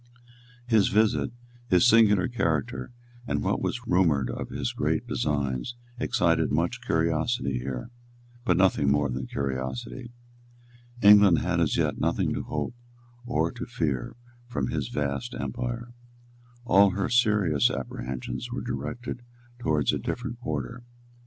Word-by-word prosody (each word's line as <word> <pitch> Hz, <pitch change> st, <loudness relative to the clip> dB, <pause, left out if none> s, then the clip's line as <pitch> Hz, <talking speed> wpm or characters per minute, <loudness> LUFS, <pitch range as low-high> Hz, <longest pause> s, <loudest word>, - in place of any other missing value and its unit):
His 110 Hz, -5 st, +4 dB
visit, 110 Hz, +1 st, +2 dB, 0.4 s
his 90 Hz, +3 st, +5 dB
singular 105 Hz, -5 st, +5 dB
character, 80 Hz, -, -1 dB, 0.4 s
and -, -, -1 dB
what -, -, 0 dB
was 125 Hz, 0 st, -3 dB
rumoured 85 Hz, -, +2 dB
of -, -, -5 dB
his -, -, -3 dB
great -, -, 0 dB
designs, 70 Hz, -, -1 dB, 0.2 s
excited 85 Hz, -11 st, +2 dB
much 85 Hz, -, 0 dB
curiosity 80 Hz, -, 0 dB
here, 65 Hz, -, -5 dB, 0.5 s
but 90 Hz, -8 st, +2 dB
nothing 90 Hz, -7 st, +3 dB
more 70 Hz, -1 st, +2 dB
than 65 Hz, +1 st, -4 dB
curiosity. 65 Hz, -, -4 dB, 0.9 s
England 100 Hz, -4 st, +8 dB
had 90 Hz, +1 st, 0 dB
as 80 Hz, -4 st, +1 dB
yet -, -, 0 dB
nothing -, -, +1 dB
to -, -, -2 dB
hope -, -, -3 dB, 0.5 s
or 120 Hz, -, +1 dB
to 125 Hz, 0 st, -7 dB
fear 75 Hz, -, -2 dB, 0.3 s
from 70 Hz, -, -2 dB
his -, -, -2 dB
vast 75 Hz, -, -3 dB
empire. 120 Hz, 0 st, -4 dB, 0.7 s
All 100 Hz, -3 st, +6 dB
her 100 Hz, +1 st, -1 dB
serious 105 Hz, -, +3 dB
apprehensions 65 Hz, -, -5 dB
were 125 Hz, -, -4 dB
directed 120 Hz, 0 st, -5 dB, 0.4 s
towards 75 Hz, -, +1 dB
a -, -, -1 dB
different 120 Hz, -1 st, -4 dB
quarter. 80 Hz, -, -4 dB
90 Hz, 130 wpm, -27 LUFS, 70-120 Hz, 0.9 s, England